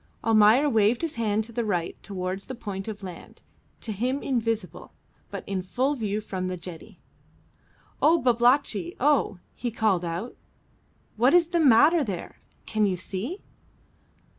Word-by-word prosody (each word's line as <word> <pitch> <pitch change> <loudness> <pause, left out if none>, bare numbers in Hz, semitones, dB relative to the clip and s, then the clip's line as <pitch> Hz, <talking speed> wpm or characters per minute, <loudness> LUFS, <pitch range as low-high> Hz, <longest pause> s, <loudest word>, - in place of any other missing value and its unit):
Almayer 225 +5 +5
waved 225 +1 +2
his 330 - -2
hand 220 -2 0
to 230 - -11
the 235 +1 -2
right 175 -6 -1
towards 190 -1 -5
the 260 - -5
point 200 -4 -6
of 210 -2 -6
land, 180 -3 -10 0.4
to 225 - -4
him 250 +7 -2
invisible, 230 -6 -2 0.4
but - - -6
in 195 -2 -2
full 255 +10 0
view 215 -6 -2
from 190 -3 -4
the 185 0 -3
jetty. 170 -2 -10 1.0
"Oh, 330 +2 +5
Babalatchi! 240 - +2
oh!" 275 -7 +2 0.2
he 245 - -3
called 215 -6 +1
out; 175 +8 -4 0.8
"what 250 +8 +4
is 340 -2 +4
the 345 -1 +1
matter 295 +4 +6
there? 195 -8 -6 0.3
can 215 -1 +1
you 185 -2 -1
see?" 205 - -5
220 Hz, 150 wpm, -26 LUFS, 195-255 Hz, 1.0 s, matter